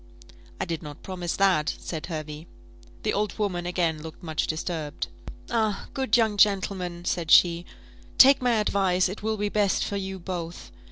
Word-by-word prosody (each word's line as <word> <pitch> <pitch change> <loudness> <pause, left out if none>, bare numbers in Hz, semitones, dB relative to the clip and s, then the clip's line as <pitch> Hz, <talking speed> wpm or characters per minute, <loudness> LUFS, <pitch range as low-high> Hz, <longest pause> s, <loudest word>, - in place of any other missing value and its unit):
"I - - -1
did 165 -3 -4
not 150 -1 -10
promise 180 -2 -4
that," 185 -6 +2
said 160 -3 -6
Hervey. 155 -1 -6 0.6
The 215 - 0
old 210 0 -1
woman 180 -5 -1
again 170 -3 0
looked 160 +3 -10
much 160 -2 -1
disturbed. 155 -2 -3 0.4
"Ah, 220 -4 0
good 265 -4 +2
young 220 -3 +2
gentleman!" 190 -4 +1
said 170 -3 -1
she, 170 0 +5 0.5
"take 270 0 +8
my 250 -1 +2
advice; 195 -4 +2
it 190 +3 -7
will 220 +1 -1
be 205 0 -1
best 205 -2 +1
for 200 - -3
you 190 -1 -4
both. 175 -2 -6
185 Hz, 165 wpm, -26 LUFS, 170-205 Hz, 0.6 s, take